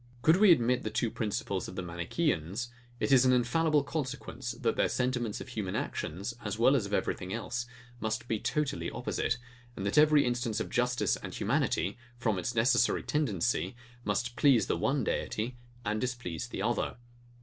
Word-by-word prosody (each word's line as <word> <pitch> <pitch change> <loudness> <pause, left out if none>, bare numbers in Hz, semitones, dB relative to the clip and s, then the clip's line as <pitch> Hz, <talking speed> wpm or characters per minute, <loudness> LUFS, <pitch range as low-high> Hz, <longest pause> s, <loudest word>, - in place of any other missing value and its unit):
Could 160 +3 +6
we 205 -1 +7
admit 125 -4 +4
the - - -3
two 115 - 0
principles 105 -3 -2
of - - -8
the - - -3
Manicheans, 90 - -1 0.3
it - - 0
is 130 -2 +7
an 130 - +5
infallible 145 +5 +3
consequence, 140 -2 -4
that - - 0
their - - +2
sentiments 125 -4 -1
of - - -8
human 100 -4 -3
actions, 95 +10 -3
as 105 -1 -3
well 125 +5 +5
as 110 -7 +1
of 100 - -7
everything 90 0 -2
else, 120 +2 -3 0.3
must 110 +1 -2
be 110 -2 0
totally 150 +4 -1
opposite, 120 - -1 0.4
and 95 - -4
that 100 +8 +3
every 150 -1 +6
instance 120 -2 -1
of - - -4
justice 125 0 +1
and - - -7
humanity, 100 +7 0 0.2
from 110 -5 0
its 120 +7 -3
necessary 120 +2 +3
tendency, 125 - 0 0.3
must 120 +4 -1
please 135 -5 +5
the - - 0
one 135 -1 +1
deity 115 +3 -2 0.3
and 105 +1 0
displease 120 -7 -3
the 100 - -4
other. 120 +2 0
120 Hz, 175 wpm, -31 LUFS, 105-130 Hz, 0.4 s, we